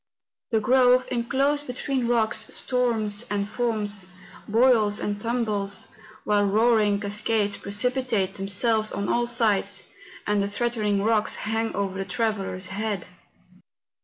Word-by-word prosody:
The 225 - +2
grove, 250 +2 +4
enclosed 275 +4 0
between 255 0 -2
rocks, 230 -2 +1
storms 230 -4 0
and 205 -1 -1
foams, 210 -4 -2 0.4
boils 220 -2 +4
and 205 0 -3
tumbles, 215 -4 -1 0.3
while 205 -1 +2
roaring 210 0 +3
cascades 205 0 0
precipitate 215 -1 -1
themselves 215 +3 0
on 200 0 -3
all 240 0 +1
sides, 205 -5 +1 0.4
and 205 -1 +1
the 200 - 0
threat¬ 240 +4 -1
ening 205 -1 +1
rocks 220 -1 +2
hang 225 +1 -2
over 195 -1 -2
the 195 - -2
traveller's 200 -5 -2
head. 200 -1 -3
215 Hz, 125 wpm, -25 LUFS, 205-240 Hz, 0.4 s, grove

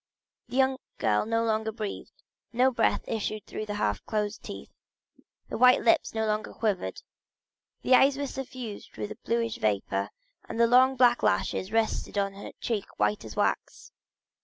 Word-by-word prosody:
The 245 - -8
young 265 0 +3 0.2
girl 105 - +1
no 230 0 +1
longer 220 0 0
breathed, 215 -2 -7 0.3
no 255 +2 +3
breath 240 - +1
issued 215 -1 -3
through 215 - -6
the 205 - -3
half 205 - -1
closed 210 -1 -2
teeth; - - -9 0.8
the - - -5
white 250 +1 +6
lips 335 -8 +3
no 220 0 0
longer 215 0 -2
quivered—the 205 - -4
eyes 270 +2 +6
were 285 - -2
suffused 255 -5 -7
with 205 - -4
a - - -7
bluish 230 -1 -1
vapor, 100 -2 -1 0.4
and - - -4
the 235 - +6
long 255 +3 +5
black 245 -1 +4
lashes 185 - 0
rested 225 -2 0
on 195 -1 0
a 200 - -9
cheek 215 -4 -3
white 105 0 +1
as 110 -1 -9
wax. - - -1
220 Hz, 160 wpm, -28 LUFS, 205-250 Hz, 0.8 s, white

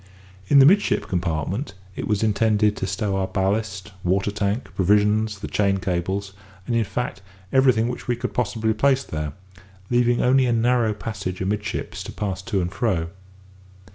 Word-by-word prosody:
In 140 - +5
the 135 - +9
midship 200 +7 +3
compartment 90 - -2 0.2
it - - -4
was 105 -1 0
intended 105 0 +2
to 95 - -2
stow 95 +1 -1
our 95 -1 0
ballast, 100 +1 -1
water 95 +3 +1
tank, 105 +4 -2
provisions, 105 +2 +2
the 100 - -6
chain 100 -2 +1
cables, 95 +2 -2 0.3
and 120 - -1
in 115 - +3
fact 100 +1 -4 0.3
everything 130 -4 +4
which 125 - -5
we 120 - +1
could 120 - -4
possibly 110 -2 0
place 135 +4 +2
there, 75 - -4 0.6
leaving 120 0 +3
only 130 +1 +4
a 120 - +2
narrow 115 -1 +2
passage 95 -4 -5
amidships 100 +2 -3
to - - -6
pass 95 -3 -3
to 100 -1 -1
and 90 0 -2
fro. 90 -9 0
105 Hz, 165 wpm, -23 LUFS, 95-115 Hz, 0.6 s, the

